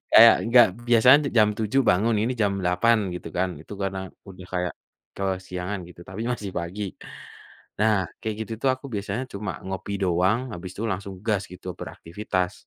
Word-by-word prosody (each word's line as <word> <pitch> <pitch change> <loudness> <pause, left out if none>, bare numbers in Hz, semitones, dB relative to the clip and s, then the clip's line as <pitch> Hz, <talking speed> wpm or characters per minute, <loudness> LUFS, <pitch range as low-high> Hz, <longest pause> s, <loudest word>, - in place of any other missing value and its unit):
kayak 115 +1 +9
enggak 120 0 +7 0.2
biasanya 125 +4 +7 0.2
jam 105 -2 +6
7.00 110 +5 +2
bangun, 110 +6 +3
ini 120 +3 0
jam 100 -1 +2
8.00 90 +6 +3 0.2
gitu 90 - -6
kan 95 0 +2
itu 80 - -12
karena 95 0 -2 0.3
udah 90 -1 -11
kayak 90 -1 -1 0.4
kesiangan 95 0 -3
gitu, 90 - -14
tapi 95 +4 -5
masih 105 -4 -4
pagi. 90 +5 -5 1.0
Nah 110 -1 +4 0.3
kayak 110 -1 -3
gitu 115 - -7
tuh 135 - +3
aku 130 +2 -11
biasanya 100 +5 -2
cuma 105 +1 -4 0.2
ngopi 95 +1 -5
doang 90 +5 +2 0.2
habis 90 +1 -7
itu 105 - -6
langsung 95 +1 -5
gas 105 -3 +1
gitu 90 0 -12
beraktivitas. 90 +1 -3
100 Hz, 165 wpm, -25 LUFS, 90-110 Hz, 1.0 s, kayak